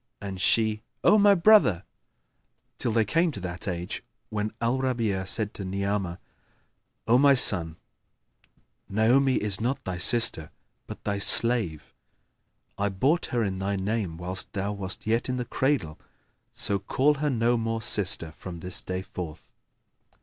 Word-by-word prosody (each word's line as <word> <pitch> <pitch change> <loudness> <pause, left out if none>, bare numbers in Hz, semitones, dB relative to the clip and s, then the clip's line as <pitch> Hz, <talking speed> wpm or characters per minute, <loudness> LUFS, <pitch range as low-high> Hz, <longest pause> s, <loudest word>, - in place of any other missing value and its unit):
and 95 -2 -6
she, 110 0 +2 0.2
"O 215 - +5
my 205 0 +6
brother!", 175 - +5 1.0
till 120 - -1
they 110 -1 +2
came 165 - +1
to 135 - -7
that 90 0 -6
age 90 -1 -4 0.3
when 105 0 -2
Al 120 +3 0
Rabi'a 115 -8 -1
said 105 +1 -2
to 100 - -7
Ni'amah, 100 -1 -2 0.9
"O 120 +2 +5
my 140 0 +6
son, 85 -10 +3 1.1
Naomi 125 +6 +3
is 105 -1 0
not 125 +4 -2
thy 90 -1 -5
sister 115 -8 +4 0.4
but - - -9
thy 100 -1 -2
slave. 110 -7 +3 0.9
I 100 0 +1
bought 135 - +1
her 120 -3 -1
in 95 -2 -3
thy 100 +1 -1
name 95 -3 -2
whilst 90 +2 -6
thou 100 +1 -2
wast 95 -2 -5
yet 115 +3 0
in 125 - -1
the 125 - -3
cradle; 130 - -1 0.5
so 100 -1 -1
call 145 +8 +1
her 150 - +1
no 120 -2 +1
more 115 -1 -2
sister 90 -6 -3
from 85 +1 -9
this 90 0 -4
day 90 0 -4
forth." 85 -5 -8
105 Hz, 150 wpm, -26 LUFS, 95-120 Hz, 1.1 s, my